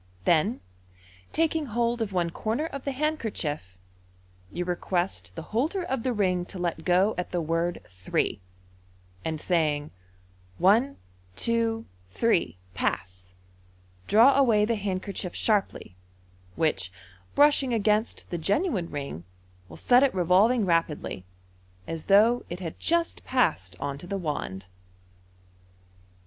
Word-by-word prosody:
Then, 175 +9 +2 0.7
taking 320 -2 0
hold 235 +1 0
of 215 -3 -1
one 175 -3 0
corner 225 - -2
of 275 -4 -7
the 280 - 0
handkerchief, 220 - -2 0.7
you 175 - -3
request 175 - -2
the - - -6
holder 315 - 0
of 265 -8 -2
the 255 - 0
ring 185 -5 +1
to - - -7
let 175 -2 -2
go 185 +4 +3
at 180 - -3
the 180 - -1
word 165 +2 -1
" - - -20 0.2
Three," 95 - 0 0.8
and 160 -1 -2
saying, 155 -4 +1
u 150 - -13 0.7
One, 230 +9 +3 0.4
two, 230 - 0 0.2
three 175 - +1
— 90 - -30
Pass! 90 0 -3 0.4
" 90 0 -31
draw 235 +6 +6
away 220 -6 +4
the 230 - 0
handkerchief 195 -2 -3
sharply, 205 - 0 0.6
which, 95 - 0 0.4
brushing 290 -3 +4
against 215 0 0
the 175 - -2
genuine 200 - 0
ring, 140 - -5 0.5
will - - -11
set 250 0 +5
it 275 -6 +2
revolving 195 +6 +4
rapidly, 165 - -1 0.6
as 165 -1 -6
though 220 +5 +5
it 175 - -5
had 165 -4 -6
just 340 0 0
passed 155 - 0
on 140 -1 -4
to 175 - -9
the 200 - -2
wand. 145 - -4
190 Hz, 135 wpm, -27 LUFS, 160-235 Hz, 0.8 s, draw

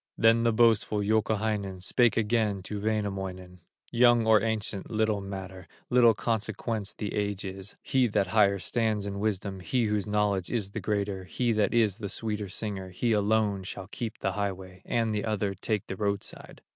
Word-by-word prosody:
Then 115 +1 +5
the 115 0 +3
boastful 110 -2 +3
Youkahainen 105 -3 0
Spake 120 +4 +3
again 105 -3 +1
to 100 +2 -5
Wainamoinen: 95 -4 -3 0.3
"Young 120 -1 +5
or 110 -2 +5
ancient, 110 -3 -2
little 110 -2 +1
matter, 95 -1 -7 0.2
Little 120 -3 +6
consequence 110 -1 -2
the 105 - -5
age 100 -1 -2
is; 95 +1 -7
He 130 -2 +2
that 100 -4 0
higher 100 -2 +4
stands 110 0 -1
in 100 -1 -4
wisdom, 100 -2 -2
He 115 +8 0
whose 105 -1 0
knowledge 105 -3 +1
is 105 -5 -1
the - - -4
greater, 100 -3 -2
He 120 +5 0
that 105 -2 +2
is 110 -3 +2
the 100 -2 -4
sweeter 105 -2 -2
singer, 95 -1 -4
He 115 +6 -1
alone 105 -1 +2
shall 95 0 -7
keep 115 0 -5
the 95 - -1
highway, 95 -2 -4
And 115 -2 0
the 105 - -1
other 105 -2 -1
take 105 +2 -2
the 95 - -5
roadside. 100 0 -4
105 Hz, 170 wpm, -28 LUFS, 100-110 Hz, 0.3 s, Little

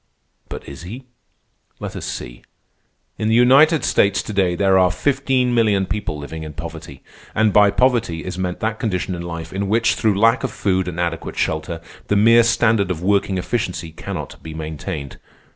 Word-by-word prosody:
But - - -8
is 70 - -9
he? 115 +10 -9 0.7
Let - - -6
us - - -5
see. - - -7 0.8
In 110 - 0
the 110 - +3
United 140 +6 +5
States 100 -1 +2
to 105 - -6
day 95 -3 +1
there 95 0 +3
are 90 -1 +4
fifteen 130 +3 +1
million 105 -5 +2
people 90 -4 -3
living 75 +2 -7
in 75 -1 -7
poverty; 80 +1 -9 0.3
and 110 -1 +3
by 105 -1 +6
poverty 115 -9 +1
is 90 - -4
meant 90 -1 -3
that 110 0 -2
condition 95 -4 -2
in 85 - -5
life 85 -1 -6
in 100 +1 -2
which, 115 +2 +3
through 105 -3 +1
lack 115 +2 +4
of - - 0
food 95 -2 0
and 85 -1 -5
adequate 85 -1 -3
shelter, 80 +1 -2 0.3
the 105 - +1
mere 115 +3 +6
standard 115 -3 +2
of 85 -2 -3
working 100 0 +1
efficiency 90 -4 -3
cannot 80 - -7
be 80 -1 -8
maintained. 75 -3 -6
95 Hz, 180 wpm, -20 LUFS, 85-115 Hz, 0.8 s, by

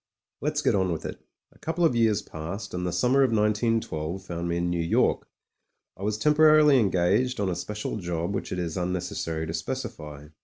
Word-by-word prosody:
Let's 150 +1 -1
get - - +3
on 95 -3 +1
with 80 - -4
it. - - -7 0.3
A - - -24
couple 165 +2 0
of 130 - +2
years 110 -3 +2
passed, 85 +7 -7
and 90 0 -2
the - - -1
summer 125 +10 +3
of 135 - +4
191 110 +1 +2
2 80 +1 -4
found 85 -1 -4
me 85 - 0
in 85 0 0
New 85 -1 0
York. 85 - +1 0.7
I - - -15
was 105 +1 -1
temporarily 150 +1 +5
engaged 100 +5 +2
on 100 -2 0
a 90 - -1
special 105 +5 -4
job 85 -1 -3
which - - -4
it - - -2
is 85 -2 -3
unnecessary 90 -3 -2
to 80 - -5
specify. 75 - -5
95 Hz, 200 wpm, -26 LUFS, 85-115 Hz, 0.7 s, temporarily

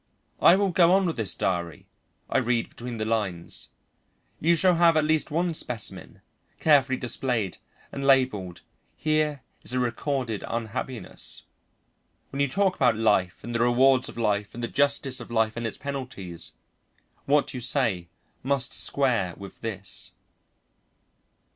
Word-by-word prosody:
"I 175 - +8
will 195 -1 +1
go 175 0 +5
on 195 0 +4
with 165 - -1
this 110 -4 -1
diary," 85 -4 -2 0.4
I - - +2
read 120 -2 0
between 120 0 -7
the 110 - -2
lines. 105 -7 -2 0.7
"You 170 +2 +4
shall 180 +2 +4
have 170 -1 +5
at 155 - +3
least 155 0 +1
one 170 +3 0
specimen, 125 -7 -5 0.4
carefully 140 -4 +4
displayed 120 -6 -1 0.3
and 140 - -5
labelled. 125 -10 +2 0.4
Here 155 -3 0 0.2
is - - -4
a 130 - +1
recorded 125 -2 -2
unhappiness. 115 +2 -4 0.9
When 140 - -5
you 140 - +3
talk 190 +5 +1
about 125 -4 +3
life 100 -5 +1
and 120 - -5
the 115 - 0
rewards 125 +2 +4
of - - -11
life 105 -3 0
and 120 - -6
the - - 0
justice 140 -1 +1
of 120 - -9
life 110 -2 +1
and 115 -1 -2
its 115 - -7
penalties, 125 -12 -5 0.7
what 145 0 +2
you 125 - -5
say 115 -9 0 0.3
must 135 -1 0
square 115 -11 +1
with 100 -1 -11
this." 100 -4 -3
125 Hz, 150 wpm, -26 LUFS, 110-140 Hz, 0.9 s, I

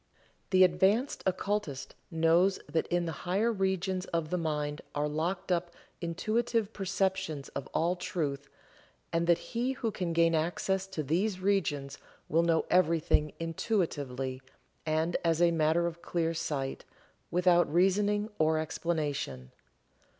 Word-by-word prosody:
The 185 -1 +6
advanced 190 +9 +2
occultist 190 -6 -2 0.2
knows 170 +3 +3
that 160 - 0
in 175 0 0
the 165 - -2 0.2
higher 210 +6 +2
regions 190 -2 -1
of 165 -2 -2
the 180 - +1
mind 150 -2 -2
are 145 0 +1
locked 170 +5 -2
up 175 0 +1 0.3
intuitive 220 +5 0
perceptions 190 -6 -1
of - - -6
all 170 +3 +1
truth, 145 -6 -3 0.6
and 170 0 +1
that 170 -1 +5 0.2
he 245 +3 0
who 230 -3 -2
can 180 -4 -3
gain 165 0 +3
access 180 +4 0
to 190 -5 -4
these 185 +7 0
regions 150 -8 0 0.3
will 165 +3 +4
know 165 -1 +2
everything 165 -3 +3
intuitively, 145 - -2 0.5
and 160 +2 +1
as 165 -1 +2
a 175 -1 +5
matter 165 +1 +2
of 170 0 -4
clear 165 -1 -1
sight, 145 -5 -3 0.5
without 175 -2 +3
reasoning 205 +5 +2
or 160 0 +3
explanation. 145 - -2
170 Hz, 135 wpm, -30 LUFS, 155-190 Hz, 0.6 s, The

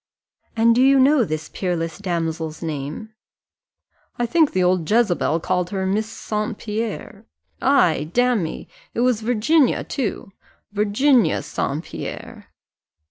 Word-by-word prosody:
"And 230 +1 +5
do 245 - +3
you 270 +1 +5
know 270 0 +5
this 155 -5 -4
peerless 170 -2 -3
damsel's 165 -4 -3
name?" 155 +8 -5 1.0
"I 240 - 0
think 310 +5 +3
the 185 - +1
old 180 -3 +1
Jezebel 195 -7 +2
called 180 0 -1
her 190 -1 -2
Miss 210 +3 -1
St. 215 0 -4
Pierre 220 0 -5 0.3
ay, 170 - +3
damme, 245 -8 0 0.3
it 235 - 0
was 245 -3 +2
Virginia 245 +6 +2
too 225 -6 -4 0.4
Virginia 215 - +2
St. 150 0 -3
Pierre." - - -8
210 Hz, 125 wpm, -21 LUFS, 170-240 Hz, 1.0 s, And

